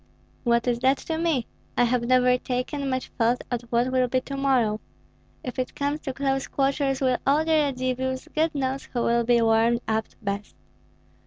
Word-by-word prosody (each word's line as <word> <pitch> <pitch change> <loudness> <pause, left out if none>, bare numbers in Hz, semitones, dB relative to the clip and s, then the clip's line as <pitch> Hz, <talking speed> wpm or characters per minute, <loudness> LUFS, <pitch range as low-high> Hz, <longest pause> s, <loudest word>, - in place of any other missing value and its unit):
"What 235 0 +2
is 240 -1 +1
that 265 +2 +3
to 320 -1 -4
me? 320 -8 +1 0.3
I - - +5
have 245 0 +2
never 250 +1 +4
taken 255 +3 -3
much 255 0 -2
thought 235 +2 +2
of 245 -1 -1
what 240 +2 +1
will 255 -1 +2
be 255 +1 +1
to 275 - -6
morrow. 255 -6 +2 0.6
If 250 0 -5
it 255 - -3
comes 290 +1 -1
to 275 - -4
close 270 0 -1
quarters 275 0 0
with 255 -2 +2
all 295 +3 +3
the 325 - 0
Radzivills, 260 -3 0
God 315 0 +1
knows 270 -1 -2
who 240 -2 -2
will 235 0 +2
be 235 0 +3
warmed 225 +1 +3
up 220 0 0 0.2
best. 200 0 -4
255 Hz, 185 wpm, -25 LUFS, 235-275 Hz, 0.6 s, I